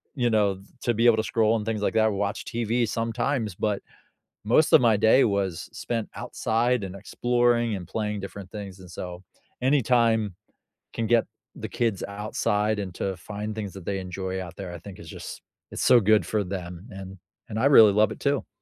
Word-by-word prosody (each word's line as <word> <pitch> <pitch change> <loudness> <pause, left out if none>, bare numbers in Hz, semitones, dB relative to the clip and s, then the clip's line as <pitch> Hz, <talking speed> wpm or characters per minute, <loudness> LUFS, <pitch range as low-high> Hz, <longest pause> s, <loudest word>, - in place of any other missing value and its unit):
you 120 -3 +1
know, 100 -3 +2 0.2
to 120 - +2
be 115 +2 +1
able 115 -2 +6
to 110 - +1
scroll 115 -1 +2
and 105 - -5
things 110 -2 -2
like - - 0
that 110 0 +4
or - - +1
watch 100 0 -2
TV 115 0 0
sometimes, 115 0 -1
but 105 +1 -1 0.6
most 135 +8 +4
of - - +8
my 115 -3 +4
day 110 +5 +5
was 100 -5 -1
spent 115 -2 -3
outside 120 +1 0
and 95 0 -6
exploring 120 +2 +1
and 90 -3 -7
playing 105 -1 -2
different 100 -1 -8
things, 100 -3 -7
and 90 -1 -12
so, 90 +1 -7 0.4
anytime 115 -6 +2 0.6
can 115 -1 -2
get 120 -1 +4 0.3
the - - -6
kids 115 -5 -1
outside 105 +1 -1
and 95 -3 -4
to 95 -1 -2
find 105 +3 -6
things 105 -3 -5
that 95 - -9
they 100 - -1
enjoy 95 0 -4
out 90 -2 -8
there, 95 -3 -7
I - - -6
think 95 +2 -11
is - - -11
just, - - -8 0.3
it's - - -3
so 125 -1 +7
good 110 0 +3
for 105 -2 0
them, 90 +1 -6
and 95 0 -9 0.3
and 110 - -3
I 135 - +2
really 115 -7 +8
love 105 0 +3
it - - -7
too. 140 -1 0
105 Hz, 200 wpm, -26 LUFS, 95-115 Hz, 0.6 s, of